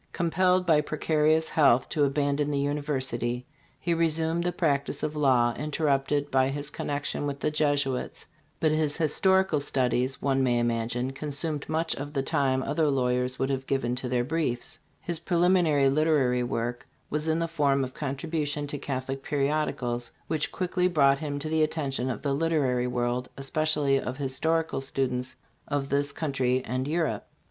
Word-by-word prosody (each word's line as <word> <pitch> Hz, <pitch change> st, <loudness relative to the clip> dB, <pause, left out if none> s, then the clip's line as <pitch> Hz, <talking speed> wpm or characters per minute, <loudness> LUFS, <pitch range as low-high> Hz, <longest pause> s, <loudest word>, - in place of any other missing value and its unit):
Compelled 180 Hz, +2 st, +2 dB
by 155 Hz, -4 st, +4 dB
precarious 155 Hz, +1 st, +1 dB
health 135 Hz, -5 st, +4 dB
to 150 Hz, -, +1 dB
abandon 145 Hz, +1 st, 0 dB
the 145 Hz, -, 0 dB
university, 135 Hz, -4 st, -2 dB, 0.3 s
he 170 Hz, -, 0 dB
resumed 165 Hz, 0 st, +1 dB
the 175 Hz, -, 0 dB
practice 145 Hz, -4 st, -1 dB
of 155 Hz, -, -2 dB
law, 125 Hz, -5 st, +3 dB
interrupted 145 Hz, -1 st, 0 dB
by 130 Hz, 0 st, +3 dB
his 145 Hz, +1 st, -4 dB
connection 145 Hz, 0 st, -3 dB
with 140 Hz, -1 st, -4 dB
the 155 Hz, -, 0 dB
Jesuits; 145 Hz, -4 st, 0 dB, 0.3 s
but 155 Hz, -, +2 dB
his 155 Hz, -1 st, +1 dB
historical 190 Hz, +1 st, +3 dB
studies, 130 Hz, -2 st, 0 dB
one 135 Hz, -1 st, +1 dB
may 125 Hz, -2 st, +2 dB
imagine, 120 Hz, +2 st, -1 dB
consumed 145 Hz, +2 st, -4 dB
much 160 Hz, +1 st, 0 dB
of 145 Hz, +1 st, -6 dB
the 135 Hz, -2 st, 0 dB
time 130 Hz, -1 st, +1 dB
other 150 Hz, +2 st, +1 dB
lawyers 125 Hz, -1 st, 0 dB
would 135 Hz, +1 st, 0 dB
have 135 Hz, 0 st, -3 dB
given 130 Hz, -3 st, 0 dB
to 125 Hz, 0 st, -4 dB
their 125 Hz, -1 st, +1 dB
briefs 155 Hz, 0 st, -2 dB, 0.2 s
His 170 Hz, -2 st, -4 dB
preliminary 170 Hz, -5 st, +3 dB
literary 135 Hz, -4 st, +2 dB
work 120 Hz, 0 st, -3 dB, 0.2 s
was 150 Hz, +1 st, -1 dB
in 160 Hz, 0 st, +2 dB
the 165 Hz, 0 st, 0 dB
form 140 Hz, -4 st, +1 dB
of 130 Hz, 0 st, -5 dB
contributions 145 Hz, 0 st, -3 dB
to 145 Hz, -, -4 dB
Catholic 135 Hz, -1 st, -4 dB
periodicals, 135 Hz, -5 st, -1 dB
which 155 Hz, -1 st, -1 dB
quickly 180 Hz, 0 st, 0 dB
brought 140 Hz, -5 st, +3 dB
him 145 Hz, -2 st, -3 dB
to 145 Hz, +2 st, -4 dB
the 160 Hz, 0 st, +1 dB
attention 140 Hz, -5 st, -1 dB
of 120 Hz, -, -4 dB
the 140 Hz, -2 st, 0 dB
literary 140 Hz, -5 st, +1 dB
world, 125 Hz, 0 st, -1 dB
especially 145 Hz, 0 st, +1 dB
of 130 Hz, 0 st, -5 dB
.historical 145 Hz, +2 st, 0 dB
students 130 Hz, -2 st, -2 dB, 0.3 s
of 140 Hz, -1 st, -2 dB
this 145 Hz, 0 st, +1 dB
country 130 Hz, -4 st, 0 dB
and 130 Hz, +3 st, -2 dB
Europe. 160 Hz, 0 st, -1 dB
145 Hz, 160 wpm, -27 LUFS, 130-155 Hz, 0.3 s, by